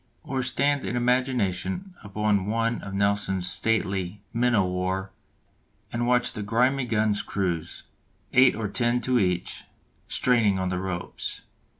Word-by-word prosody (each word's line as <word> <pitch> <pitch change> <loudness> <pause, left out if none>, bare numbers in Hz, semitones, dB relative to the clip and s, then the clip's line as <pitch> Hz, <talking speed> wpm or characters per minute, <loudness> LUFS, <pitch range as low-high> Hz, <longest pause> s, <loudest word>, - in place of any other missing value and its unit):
Or 135 -1 -2
stand 140 +3 +1
in - - -3
imagination 125 - 0
upon 105 -1 0
one 115 +2 0
of 100 -1 -6
Nelson's 100 -2 +1
stately 100 -2 0
men 120 0 +2
o' 100 -3 +3
war 95 +1 -2 0.8
and 120 0 0
watch 125 0 +2
the 105 - -5
grimy 125 +5 +1
guns' 110 -2 +1
crews, 90 -5 -3 0.5
eight 130 +1 +6
or 110 -1 -2
ten 120 +3 +1
to 125 -1 +2
each, 90 -3 -1 0.4
straining 115 -6 +2
on 95 -1 -1
the 90 -1 -1
ropes. 90 -2 -4
105 Hz, 135 wpm, -26 LUFS, 95-125 Hz, 0.8 s, eight